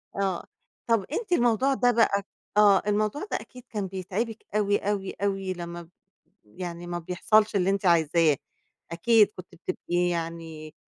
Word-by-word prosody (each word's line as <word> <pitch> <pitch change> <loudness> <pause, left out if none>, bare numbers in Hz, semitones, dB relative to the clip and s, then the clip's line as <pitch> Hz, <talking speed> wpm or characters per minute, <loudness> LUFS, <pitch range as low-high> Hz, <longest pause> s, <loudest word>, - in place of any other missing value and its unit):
آه، 195 -3 -1 0.4
طَب 225 -5 +2
أنتِ 415 +4 -3
الموضوع 250 -1 +3
ده 245 -2 +3
بقى 210 -4 +2 0.3
آه، 205 -2 +6
الموضوع 210 +7 0
ده - - +1
أكيد 250 -1 -13
كان 205 -3 -3
بيتعِبِك 195 +5 -4
أوي، 205 -1 +3
أوي، 200 -1 -2
أوي 195 -2 -1
لمّا 170 -1 -8 0.6
يعني 175 - -7
ما 175 0 -3
بيحصَلش 210 +5 +2
اللي 190 0 +2
أنتِ 195 0 0
عايزاه، 165 -3 +4 0.5
أكيد، 210 +4 +4
كنتِ 185 - -9
بتبقي 175 0 -1
يعني 165 -2 -5
195 Hz, 145 wpm, -26 LUFS, 175-215 Hz, 0.6 s, آه